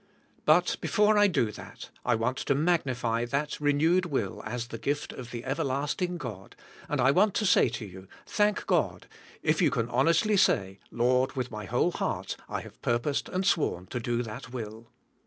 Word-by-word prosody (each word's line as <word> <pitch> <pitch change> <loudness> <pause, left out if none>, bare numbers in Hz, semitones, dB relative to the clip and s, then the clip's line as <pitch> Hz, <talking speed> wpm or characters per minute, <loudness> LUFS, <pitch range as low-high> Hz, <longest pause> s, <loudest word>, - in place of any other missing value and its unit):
But - - +4
be - - -3
fore 210 0 +4
I 205 0 +6
do 120 - +1
that, - - -11
want 120 +2 +1
to 140 - 0
magnify 130 -7 +1
that 140 +4 -2
renewed 160 +5 +3
will 140 -5 -2
as 120 +1 -4
the 115 - -6
gift 145 +5 -2
of 125 -2 -8
the 120 0 -6
Everlasting 140 +7 -1
God, 105 - -8 0.3
and - - -1
I 130 - +5
want 195 +6 +3
to 215 - +1
say 185 - +5
to 115 -2 -5
yoUj 95 0 -12 0.2
Thank 210 -1 +1
God, - - 0 0.4
if - - +2
you - - +5
can 115 - -1
honestly 165 - +3
say, 95 - +2
"Lord, 125 +2 +2
with 125 -2 -3
my 105 -1 -6
whole - - +1
heart - - -3
I - - -3
have - - -14
purposed 120 +4 0
and 185 +1 -1
sworn 150 - +1
to 125 - -2
do 120 +1 -1
that 115 +1 -8
will. 115 -1 -7
130 Hz, 185 wpm, -28 LUFS, 115-165 Hz, 0.4 s, I